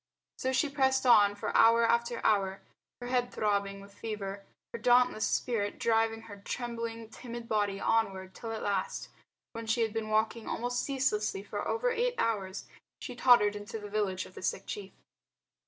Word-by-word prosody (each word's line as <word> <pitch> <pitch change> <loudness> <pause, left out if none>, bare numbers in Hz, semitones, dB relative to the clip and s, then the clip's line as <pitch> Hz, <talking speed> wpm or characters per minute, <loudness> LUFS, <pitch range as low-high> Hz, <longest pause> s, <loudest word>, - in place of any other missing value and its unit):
So 260 - 0
she 260 +3 +2
pressed 265 -2 +1
on 205 -4 +6
for 205 - -4
hour 230 +1 +6
after 235 0 0
hour, 195 -2 +2 0.4
her 245 - -5
head 245 -1 +1
throbbing 200 -2 -1
with 200 0 -14
fever, 200 -2 -5 0.3
her 235 - -4
dauntless 245 -1 +4
spirit 205 -4 -1
driving 225 -1 +2
her 205 -2 -11
trembling, 230 -1 -4
timid 235 -1 -8
body 205 -3 0
onward 195 -5 0
till 230 - -6
at 220 - -4
last, 195 -2 -2 0.4
when 230 -1 -6
she 230 +2 +1
had 220 -2 0
been 225 -1 -3
walking 220 +1 0
almost 245 +1 -1
ceaselessly 215 -8 -1
for 205 0 -4
over - - +1
eight 480 +1 0
hours, 200 - -1 0.3
she 250 - -7
tottered 240 -5 +5
into 205 +2 -6
the 205 -1 -9
village 195 -3 -1
of - - -14
the - - -10
sick 190 +1 -2
chief. 200 -2 -6
225 Hz, 170 wpm, -31 LUFS, 205-240 Hz, 0.4 s, on